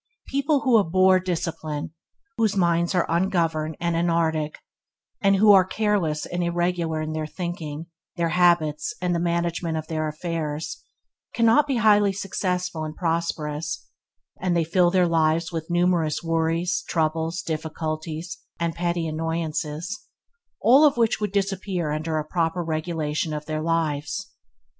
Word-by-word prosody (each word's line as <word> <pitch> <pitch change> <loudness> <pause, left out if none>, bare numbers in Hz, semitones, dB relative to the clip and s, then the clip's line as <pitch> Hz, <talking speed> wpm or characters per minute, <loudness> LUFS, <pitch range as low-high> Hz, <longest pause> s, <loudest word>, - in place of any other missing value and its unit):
People 280 +1 +1
who 245 -4 +5
abhor 185 0 +4
discipline, 165 -4 -3 0.4
whose 220 -3 +1
minds 170 0 +2
are 175 - +3
ungoverned 165 -3 0
and 170 0 0
anarchic, 165 -2 0 0.6
and 195 -1 +4
who 205 +2 +6
are 195 -2 +8
careless 190 -6 0
and 175 0 -2
irregular 170 -2 0
in 155 0 -4
their 155 -1 -3
thinking, 165 -3 -5 0.3
their 170 -2 0
habits 170 +1 +2
and 180 -1 0
the 170 - 0
management 170 -1 -1
of 155 - -4
their 155 -1 -2
affairs, 155 -1 -4 0.5
cannot 230 +6 +4
be 275 - 0
highly 210 -3 +4
successful 180 -3 -2
and 155 0 -5
prosperous, 165 -3 -2 0.6
and 180 -2 +1
they 170 - +2
fill 175 +2 +3
their 180 -1 +3
lives 165 0 +1
with 165 -1 -5
numerous 175 -3 +1
worries, 165 +1 0
troubles, 160 +1 0
difficulties, 160 +1 -4 0.2
and 170 -1 -1
petty 170 0 -1
annoyances, 160 - -3 0.5
all 265 +6 +6
of 290 -5 +5
which 225 -2 +2
would 210 - -1
disappear 195 -4 -1
under 155 +1 -2
a 155 - -2
proper 170 +1 -1
regulation 155 -1 -2
of 150 0 -5
their 155 0 -3
lives. 155 -3 -1
170 Hz, 140 wpm, -24 LUFS, 155-180 Hz, 0.6 s, are